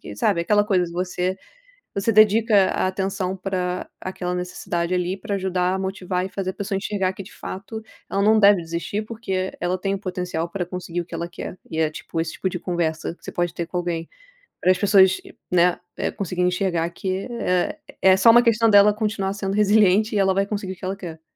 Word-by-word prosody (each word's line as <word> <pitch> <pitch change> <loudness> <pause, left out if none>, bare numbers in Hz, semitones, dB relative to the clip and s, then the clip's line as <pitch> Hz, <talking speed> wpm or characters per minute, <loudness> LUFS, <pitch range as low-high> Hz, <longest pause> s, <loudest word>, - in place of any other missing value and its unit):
sabe 170 - +1
aquela 205 +3 +3
coisa 185 -4 +2
de 170 - -9
você. 180 +1 -2 0.6
Você 200 +3 +1
dedica 215 -1 +5
a - - 0
atenção 190 0 -2
pra 185 -1 -3
aquela 180 -1 -4
necessidade 180 -1 -3
ali, 180 +1 -1
pra 200 +1 -4
ajudar 185 -1 0
a - - -1
motivar 190 -1 -2
e - - -4
fazer 190 -1 -3
a - - -6
pessoa 200 -1 -3
enxergar, 195 -1 -1
que 195 - -8
de 195 - -14
fato 220 +4 -7 0.3
ela 195 - 0
não 215 +2 +5
deve 200 -2 +6
desistir, 170 +6 -3
porque 195 -4 -3
ela 175 +1 0
tem 195 +1 -1
potencial 180 -3 -3
pra 180 +1 -3
conseguir 180 -1 -4
o 170 - -4
que 170 - -11
ela 170 +1 -3
quer, 180 - -7
e 160 - -4
é 160 -1 +3
tipo 165 +1 -5
esse 165 0 -2
tipo 190 - -1
de 180 - -4
conversa, 165 -3 -2
que - - -41
você - - -5
pode 175 -1 -1
ter 170 - -4
com 180 - -6
alguém, 170 -2 -2 0.5
pra - - +1
as 185 - +2
pessoas, 190 -1 +5 0.3
né, 180 -1 +3 0.4
conseguir 180 -2 -2
enxergar 180 -2 +1
que 185 +2 -3
é 180 -6 -1 0.2
é 190 0 +6
só 190 +4 +6
uma 240 +1 +7
questão 230 -1 +3
dela 205 0 +7
continuar 210 -3 -1
sendo 195 0 -3
resiliente, 210 0 +4
e 205 - +1
ela 190 -1 +3
vai 195 +1 +1
conseguir 200 -2 -4
o - - -12
que 180 - -23
ela 190 +1 -3
quer. 165 -4 -8
190 Hz, 215 wpm, -23 LUFS, 180-200 Hz, 0.6 s, uma